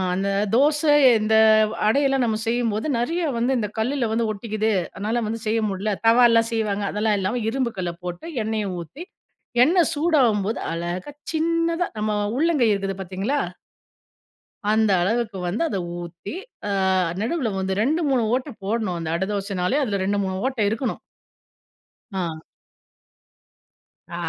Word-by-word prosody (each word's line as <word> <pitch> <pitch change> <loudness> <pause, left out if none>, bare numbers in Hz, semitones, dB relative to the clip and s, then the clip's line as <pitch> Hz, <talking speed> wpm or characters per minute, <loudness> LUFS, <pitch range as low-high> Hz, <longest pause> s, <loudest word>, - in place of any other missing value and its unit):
அந்த 195 +1 -1 0.3
தோச 295 +5 +4 0.4
இந்த 215 +1 +2 0.5
அடையெல்லாம் 270 +2 +2
நாம 220 -2 0
செய்யும்போது 230 0 0
நெறைய 325 +10 -1 0.2
வந்து 240 +3 +1
இந்த 215 -3 -1
கல்லுல 245 +2 0
வந்து 225 0 +1
ஒட்டிக்கிது. 215 +1 -2 0.2
அதனால, 220 +4 -2
வந்து 225 +2 -3
செய்ய 225 +1 +2
முடில. 200 +2 -2
தவா 230 +2 +6
எல்லாம் 230 0 +3
செய்வாங்க. 210 -3 -1
அதெல்லாம் 210 0 +1
இல்லாம, 215 +6 -1
இரும்பு 250 0 -1
கல்ல 175 -2 -2
போட்டு 175 - -6 0.2
எண்ணெய 215 -1 -2
ஊத்தி 170 - -8 0.6
எண்ணெய் 340 +5 +3
சூடாகும்போது, 250 - +2
அழகா 175 +8 -4 0.2
சின்னதா 335 +2 +1
நம்ம 215 0 0 0.3
உள்ளங்கை 300 -5 +3
இருக்குது 195 -1 -2
பார்த்தீங்களா? 195 +10 -2 1.3
அந்த 220 -1 +3
அளவுக்கு 215 +2 0
வந்து 180 +6 -2
அத 240 - -2 0.2
ஊத்தி 175 +3 -8 0.4
ஆ - - -1 0.5
நடுவுல 250 +1 -1
வந்து 190 0 -1
2 305 +9 +1
3 255 -4 +2
ஓட்ட 255 +3 -1
போடணும். 205 -3 -1
அந்த 165 -1 -4
அட 180 +3 0
தோசனாலே 200 +4 -1
அதில 200 -6 -1
2 200 +2 0
3 190 0 -3
ஓட்ட 265 -2 -2
இருக்கணும். 225 +5 -2 1.1
ஆ. 170 -4 -3 1.7
ஆ - - -7
220 Hz, 140 wpm, -23 LUFS, 195-255 Hz, 1.7 s, தவா